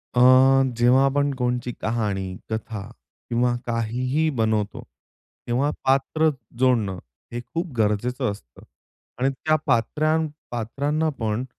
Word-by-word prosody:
अ, - - +3 0.6
जेव्हा 125 +3 +5
आपण 145 +1 +1
कोणची 125 -1 -1
कहाणी, 100 -5 -2
कथा 110 -1 -4 0.5
किंवा 120 0 +2
काहीही 125 +6 0
बनवतो, 110 -2 0 0.7
तेव्हा 125 +4 +1
पात्र 140 +4 +2 0.3
जोडणं 115 -7 +2 0.4
हे 120 - -2
खूप 170 0 -4
गरजेचं 105 +2 0
असतं. 65 - -13 0.6
आणि 130 +2 +2
त्या 155 +3 0
पात्रां 155 +6 +1 0.2
पात्रांना 140 +7 -1
पण 110 +1 -1
125 Hz, 110 wpm, -24 LUFS, 110-135 Hz, 0.7 s, जेव्हा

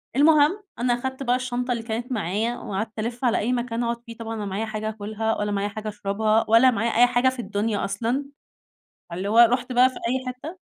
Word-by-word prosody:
المهم، 305 +7 +4 0.2
أنا 245 0 +2
اخدت 260 +2 -4
بقى 245 -1 +2
الشنطة 250 0 -2
اللي 235 -2 -2
كانت 230 +2 -4
معايا، 220 +2 -1
وقعدت 215 +3 -5
ألِفّ 235 +3 -3
على 240 - +3
أي 240 +4 0
مكان 240 -1 -2
أقعد 235 0 -2
فيه، 230 -1 -10
طبعًا 225 -1 -5
أنا 215 - -5
لا - - -3
معايا 200 +3 -2
حاجة 215 0 -4
اكلها 220 +1 -2
ولا 210 0 -1
معايا 200 0 0
حاجة 215 +1 -7
اشربها 215 +2 0
ولا 230 +3 +6
معايا 225 +1 0
أي 245 - +7
حاجة 245 +1 +3
في 260 -1 -8
الدنيا 210 -1 -1
أصلًا. 230 +8 -2 0.9
فاللي 185 +4 -4
هو 220 +3 +2
رُحت 245 +2 +5
بقى 250 +1 +6
في 260 - -11
أي 255 +3 -2
حتّة؟ 270 +8 -7
235 Hz, 220 wpm, -24 LUFS, 215-250 Hz, 0.9 s, أي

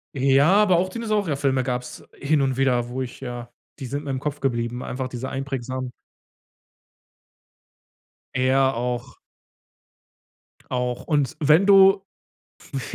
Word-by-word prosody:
Äh, 135 0 +2
ja, 145 +5 +5
aber 200 -3 +4
auch 185 +2 +1
Dinosaurier-Filme 165 - 0
gab‘s 125 -1 -4
hin 145 +1 0
und 130 -1 0
wieder, 125 -3 +1
wo 130 +2 -4
ich 125 - -6
ja 120 -2 -7 0.3
die 135 - -5
sind 145 +4 -4
mir - - -5
im 130 -1 -2
Kopf 150 +1 -4
geblieben, 120 -2 -2
einfach 130 0 -4
diese 130 +1 -6
einprägsamen. 130 -2 -4 2.4
Äh, 130 0 +1
ja, 135 0 +3
auch. 125 +1 -4 1.5
Auch. 125 -1 -2
Und, 145 -5 0
wenn 155 +5 +4
du, 195 -1 +6 0.7
pf 120 -3 -5
135 Hz, 135 wpm, -23 LUFS, 125-150 Hz, 2.4 s, du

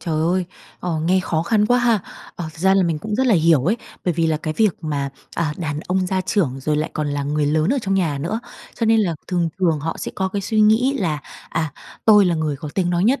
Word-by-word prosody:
Trời 165 -2 -2
ơi, 180 +3 +1 0.4
ờ, 170 -3 -2
nghe 180 +4 +2
khó 160 -3 -1
khăn 210 +2 +2
quá 245 +2 +3
ha. 235 -4 +3 0.4
Ờ, 175 - -4
thật - - -16
ra 190 +2 +4
là 195 - +4
mình 165 -3 0
cũng 210 +5 -4
rất 260 +3 +1
là 225 - +5
hiểu 160 -5 +4
ấy, 210 +7 +2 0.3
bởi 175 -3 +1
vì 165 -1 +1
là 155 -1 +1
cái 155 0 -4
việc 215 -6 +3
mà, 140 -2 -2 0.2
à, 155 -3 -1
đàn 150 -3 -3
ông 185 +1 -1
gia 190 0 0
trưởng, 150 - 0
rồi 150 +2 0
lại 155 - -1
còn 150 -1 -2
là 145 0 -2
người 145 +1 0
lớn 155 +4 +2
ở 280 - +1
trong 195 -2 0
nhà 165 -7 0
nữa. 210 +10 -2 0.3
Cho 230 - -1
nên 225 0 +4
là 175 -6 0
thường 175 -2 +1
thường 165 -5 +2
họ 165 +2 -3
sẽ - - -4
có 190 -1 -1
cái 200 +1 -3
suy 220 +1 +1
nghĩ 220 +6 +4
là, 160 -6 0 0.3
à, 160 -3 -2 0.3
tôi 210 -2 +7
là 175 -2 +2
người 155 -3 -1
có 150 +2 -7
tiếng 180 -2 +1
nói 175 +2 +1
nhất, 260 +5 +3
175 Hz, 270 wpm, -21 LUFS, 155-200 Hz, 0.4 s, tôi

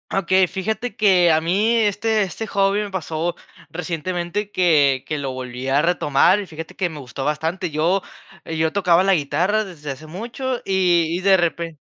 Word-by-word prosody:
Okey, 185 0 +3
fíjate 215 +5 -3
que, 190 -5 +4
eh, - - +5
a 155 - +2
mí 195 +7 +1
este 220 0 +1
este 205 +3 -3
hobby 195 +1 +1
me 205 - -5
pasó 170 -2 -3 0.3
recientemente, 175 +4 -3
que 145 -7 +3
que 155 - -3
lo 140 -2 -3
volví 125 0 -6
a 135 +2 +3
retomar. 170 +2 +3
Y 205 - -5
fíjate 165 +3 -9
que 180 - +1
me 155 -3 -8
gustó 135 +1 -6
bastante. 165 +4 -2
Yo 165 +6 +1 0.4
yo 160 0 -1
tocaba 180 -2 +3
la 195 0 +4
guitarra 185 +8 0
desde 150 -7 -7
hace 155 +4 -9
mucho, 240 - -4
y 180 -3 +2
y - - -4
de 190 +1 +4
repe 170 -2 -1
175 Hz, 180 wpm, -21 LUFS, 155-195 Hz, 0.4 s, eh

